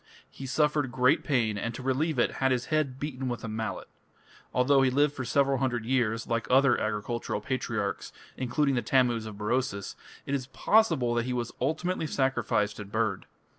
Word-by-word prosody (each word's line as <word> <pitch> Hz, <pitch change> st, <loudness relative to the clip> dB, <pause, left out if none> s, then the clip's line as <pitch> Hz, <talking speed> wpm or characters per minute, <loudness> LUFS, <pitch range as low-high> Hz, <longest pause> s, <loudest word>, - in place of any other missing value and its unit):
He 135 Hz, -, -8 dB
suffered 150 Hz, -1 st, +1 dB
great 125 Hz, +1 st, +3 dB
pain, 115 Hz, -7 st, +1 dB
and 115 Hz, +3 st, -3 dB
to 130 Hz, -, -7 dB
relieve 135 Hz, +4 st, 0 dB
it 120 Hz, -, +1 dB
had 135 Hz, 0 st, +3 dB
his 125 Hz, -1 st, 0 dB
head 140 Hz, -4 st, 0 dB
beaten 130 Hz, -3 st, -3 dB
with 120 Hz, -, -4 dB
a -, -, -4 dB
mallet. 110 Hz, -3 st, -4 dB, 0.6 s
Although 135 Hz, +2 st, +4 dB
he 130 Hz, -, +4 dB
lived 145 Hz, +3 st, +2 dB
for 130 Hz, -, -5 dB
several 135 Hz, +1 st, +2 dB
hundred 125 Hz, -4 st, -1 dB
years, 115 Hz, -3 st, 0 dB
like 115 Hz, -2 st, -2 dB
other 130 Hz, -1 st, +5 dB
agricultural 110 Hz, +2 st, -2 dB
patriarchs, 110 Hz, -3 st, -3 dB, 0.2 s
including 135 Hz, +3 st, 0 dB
the 120 Hz, -, +1 dB
Tammuz 120 Hz, -5 st, +2 dB
of 105 Hz, -2 st, -8 dB
Berosus, 105 Hz, -2 st, -2 dB, 0.3 s
it 140 Hz, -, -3 dB
is 130 Hz, -3 st, -2 dB
possible 160 Hz, -, +2 dB
that 120 Hz, 0 st, 0 dB
he 125 Hz, -, -2 dB
was 120 Hz, -1 st, -2 dB
ultimately 160 Hz, +5 st, -1 dB
sacrificed 115 Hz, -7 st, 0 dB
and 100 Hz, -1 st, -8 dB
burned. 110 Hz, -3 st, -1 dB
125 Hz, 180 wpm, -28 LUFS, 115-135 Hz, 0.6 s, other